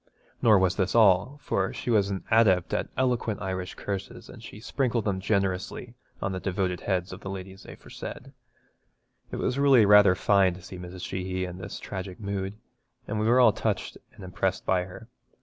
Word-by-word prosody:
Nor 110 -3 +6
was 95 -1 +2
this 95 +1 0
all, 105 +4 +4
for 95 0 0
she 120 - -3
was 100 -3 +3
an 95 -2 -4
adept 100 -6 +4
at - - -1
eloquent 125 -4 0
Irish 95 -2 -4
curses, 100 -1 -6
and - - -11
she 105 - -10
sprinkled 120 -1 -1
them 100 -3 0
generously 100 +4 -2 0.3
on 100 - -1
the 95 - -3
devoted 90 -1 -1
heads 90 -2 -1
of 95 - -10
the 95 - -6
ladies 95 0 -8
aforesaid. - - -9 1.0
It - - -6
was 125 - -1
really 135 -6 +6
rather 100 -2 +7
fine 95 -2 +3
to 90 - -12
see 90 -1 -9
Mrs. 90 0 -7
Sheehy 95 0 -3
in 90 0 -8
this - - -7
tragic 95 -1 -7
mood, 100 -1 -4 0.5
and 105 +1 -2
we 110 - +1
were 120 +2 +5
all 125 - +6
touched - - -2 0.2
and - - -12
impressed 95 +1 -2
by 90 -1 +1
her. 95 +5 -11
95 Hz, 185 wpm, -27 LUFS, 95-105 Hz, 1.0 s, rather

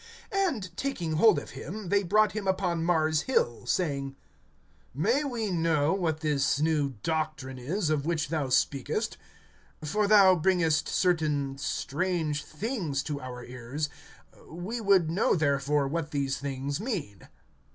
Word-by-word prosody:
(19)And 270 - -1
taking 220 -12 -2
hold 185 +6 +5
of - - -5
him, 180 +8 -7
they 200 +1 +3
brought 210 +2 +3
him 210 -2 -4
upon 180 -3 0
Mars' 160 -2 +2
Hill, 120 - 0
saying: 140 -4 -1 0.8
May 230 - +2
we 235 -7 -2
know 160 -3 +2
what 165 -5 -1
this 145 -2 +1
new 150 -4 +1
doctrine 155 -5 -2
is, 155 +6 -1
of 150 -2 +1
which 155 -2 -1
thou 150 -4 -1
speakest? 135 +1 0 0.7
(20)For 205 +7 +1
thou 200 -3 +7
bringest 165 -3 +2
certain 150 -6 +1
strange 155 +1 -1
things 165 - -3
to 145 -2 -4
our 125 -1 -7
ears; 125 +5 -4 0.6
we 185 +9 -5
would 190 -6 +4
know 185 +4 +2
therefore 140 -2 +1
what 155 +1 -2
these 140 -2 -1
things 140 +1 -3
mean. 175 - -4
160 Hz, 140 wpm, -28 LUFS, 140-190 Hz, 0.8 s, thou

